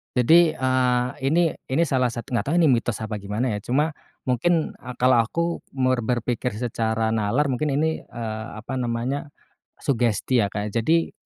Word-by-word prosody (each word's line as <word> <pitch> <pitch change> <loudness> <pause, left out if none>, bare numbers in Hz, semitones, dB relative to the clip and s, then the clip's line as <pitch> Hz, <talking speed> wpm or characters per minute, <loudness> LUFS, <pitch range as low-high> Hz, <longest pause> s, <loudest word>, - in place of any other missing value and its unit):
Jadi, 160 +6 +5
eee, 130 -1 +2 0.2
ini 165 +5 +3 0.2
ini 135 +6 +2
salah 130 -5 +1
satu 120 0 -6
nggak 120 - 0
tahu 155 - +1
ini 165 - +5
mitos 115 -2 0
apa 110 -1 -3
gimana 105 +5 -2
ya, - - -5
cuma 135 +9 0 0.3
mungkin, 155 +6 +1
eee, 125 0 -9
kalau 125 0 +4
aku 115 +9 0 0.3
mer 130 -1 +2
berpikir 120 0 -1
secara 110 -1 -1
nalar 115 +7 +1
mungkin 145 +3 0
ini, 160 +2 0
eee, 110 -2 -5
apa 115 +5 -5
namanya, 125 +5 -2 0.5
sugesti 120 -1 +1
ya, 100 - +1
Kak. 105 +1 -4
Jadi 160 +9 +2
125 Hz, 165 wpm, -24 LUFS, 115-140 Hz, 0.5 s, Jadi